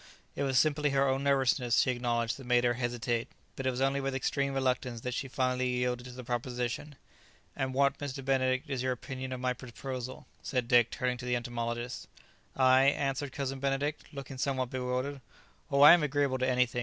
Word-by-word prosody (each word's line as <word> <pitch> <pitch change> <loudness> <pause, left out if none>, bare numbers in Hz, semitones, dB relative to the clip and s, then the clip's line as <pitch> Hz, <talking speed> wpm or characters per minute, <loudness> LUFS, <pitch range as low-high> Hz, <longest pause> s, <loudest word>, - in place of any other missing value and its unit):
It - - -3
was 135 -2 +1
simply 150 +1 +3
her 140 0 +2
own 135 +1 0
nervousness, 135 -3 +2
she 130 - +4
acknowledged, 120 -2 -1
that 135 -3 -11
made 125 -1 +3
her 120 0 +3
hesitate; 120 -1 -2 0.3
but 135 - -3
it - - +4
was 130 0 -3
only 135 +1 +2
with 135 0 -2
extreme 140 +1 0
reluctance 125 -3 -1
that 125 +1 -3
she 135 - -3
finally 130 -1 0
yielded 125 0 -1
to 125 - -8
the 125 +1 -9
proposition. 125 +4 -3 0.6
"And 130 -1 -2
what, 140 0 +2
Mr. 135 -2 -5
Benedict, 130 +1 +1
is 135 -3 -2
your 130 0 0
opinion 130 +1 -6
of 130 - -4
my 125 0 0
proposal?" 130 +1 -7 0.2
said 125 -3 -2
Dick, 120 -1 +5
turning 125 -1 -2
to 125 - -6
the 125 0 +1
entomologist. 120 0 -4 0.5
"I?" 130 0 +5
answered 140 0 0
Cousin 135 0 -3
Benedict, 140 +2 -1
looking 135 -2 -8
somewhat 130 -2 -1
bewildered, 130 +2 -2 0.5
"Oh, 140 0 +2
I 150 +3 +11
am 175 - +5
agreeable 145 -2 0
to 130 +1 +1
anything. 125 -1 +1
130 Hz, 195 wpm, -30 LUFS, 125-135 Hz, 0.6 s, I